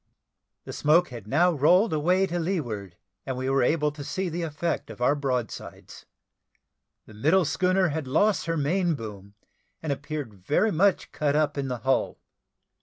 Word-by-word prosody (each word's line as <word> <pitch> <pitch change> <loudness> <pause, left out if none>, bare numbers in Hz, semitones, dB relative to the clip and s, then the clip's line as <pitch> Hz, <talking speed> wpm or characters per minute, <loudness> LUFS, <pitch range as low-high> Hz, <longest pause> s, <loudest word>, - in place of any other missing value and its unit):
The - - -8
smoke 155 +4 +3
had 115 -5 -9
now 170 +9 +3
rolled 175 - +3
away 180 +5 +2
to 175 -1 -3
leeward, 120 - -3 0.3
and 130 -1 -4
we 130 +1 -1
were 135 0 +3
able 150 +3 +2
to 145 -1 -8
see 185 +5 -3
the 170 +2 -4
effect 165 +1 -3
of - - -10
our 125 +3 +3
broadsides. 130 -5 -5 1.0
The 110 - -15
middle 160 - +2
schooner 185 +4 +2
had 150 -2 -3
lost 195 +10 +2
her 165 0 0
main 170 +3 +1
boom, 100 -4 -9 0.4
and 155 -3 -2
appeared 145 -4 -6
very 140 - 0
much 195 +3 +2
cut 145 -1 0
up 150 -1 +1
in 140 -1 -2
the 125 -1 -3
hull. 135 0 +1
150 Hz, 170 wpm, -26 LUFS, 130-175 Hz, 1.0 s, smoke